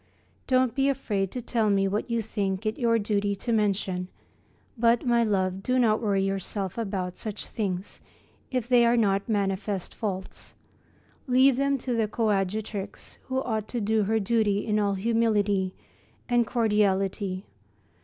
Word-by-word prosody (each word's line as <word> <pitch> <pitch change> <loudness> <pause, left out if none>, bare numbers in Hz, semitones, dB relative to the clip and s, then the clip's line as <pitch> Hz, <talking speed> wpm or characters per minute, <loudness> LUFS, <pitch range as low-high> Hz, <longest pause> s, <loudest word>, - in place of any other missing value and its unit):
Don't 255 -2 +3
be 275 0 +2
afraid 205 -8 -1
to 245 +4 -6
tell 225 -3 +1
me 195 -1 +2
what 205 +5 -2
you 230 -1 0
think 200 -1 -2
it 215 +1 -2
your 230 -2 +3
duty 205 -1 0
to 235 +4 -4
mention, 195 -4 0 0.7
but, 235 0 +2
my 235 -1 +3
love, 190 -3 0
do 255 +5 0
not 225 -3 +3
worry 200 -3 +1
yourself 195 0 -3
about 195 -5 -3
such 215 -2 -4
things, 195 -3 -4 0.5
if 250 -3 -2
they 245 -1 +5
are 235 +1 +4
not 200 -1 +1
manifest 195 -2 -1
faults. 190 -3 -5 0.7
Leave 260 +1 +5
them 275 +1 +1
to 250 -1 -3
the 225 -2 +1
coadjutrix, 210 -2 -2
who 260 0 -1
ought 220 -3 -2
to 245 - -3
do 215 0 +1
her 220 +2 +1
duty 210 -1 +1
in 215 -1 +1
all 200 -1 +1
humility 205 -3 +1 0.5
and 240 -2 +2
cordiality. 200 -4 0
215 Hz, 155 wpm, -27 LUFS, 195-235 Hz, 0.7 s, they